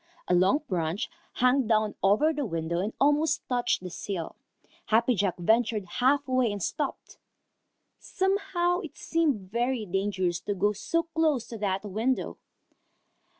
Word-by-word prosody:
A - - +2
long 190 - +3
branch 175 0 -2 0.2
hung 250 0 +3
down 215 -2 +2
over 215 +12 +4
the 295 -1 -2
window 165 -5 -2
and 205 +4 -1
almost 295 +2 +2
touched 245 -6 0
the 180 - -6
sill. 175 -3 -5 0.5
Happy 230 +3 +3
Jack 200 -4 0
ventured 220 +2 +2
half 265 +9 +1
way 255 -3 +2
and 205 - -4
stopped. 295 -3 -4 0.8
Somehow 380 -2 0
it 330 -6 -9
seemed 280 - 0
very 240 0 0
dangerous 190 -2 -1
to 205 +2 -3
go 205 +3 +2
so 215 +12 -1
close 320 -6 0
to 230 - -6
that 195 -1 -1
window. 220 +6 -2
225 Hz, 145 wpm, -28 LUFS, 195-285 Hz, 0.8 s, over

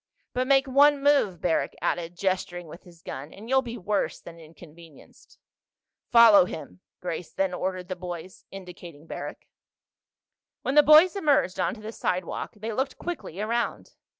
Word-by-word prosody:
"But 255 +1 -1
make 270 0 +4
one 280 +1 +4
move," 275 - +2
Barrack 170 -2 0
added, 175 0 -2
gesturing 180 -2 -2
with 170 +5 -13
his 170 -2 -18
gun, 140 +4 -7
"and 210 +3 -12
you'll 265 +1 +3
be 240 -2 -7
worse 205 0 -2
than 170 0 -12
inconvenienced." 165 -1 -17 0.7
"Follow 230 -5 +7
him," 90 - -9 0.2
Grace 175 -1 -5
then 190 -1 -1
ordered 185 0 -3
the 185 - -4
boys, 180 0 -8
indicating 175 -5 -11
Barrack. - - -7 1.2
When 265 - -1
the 295 - +8
boys 310 +5 +7
emerged 290 - +1
onto 185 +5 -1
the 215 +1 -7
sidewalk 180 -5 -3
they 220 +2 -5
looked 265 +5 -2
quickly 335 - -6
around. 230 +3 -2
185 Hz, 150 wpm, -26 LUFS, 175-250 Hz, 1.2 s, the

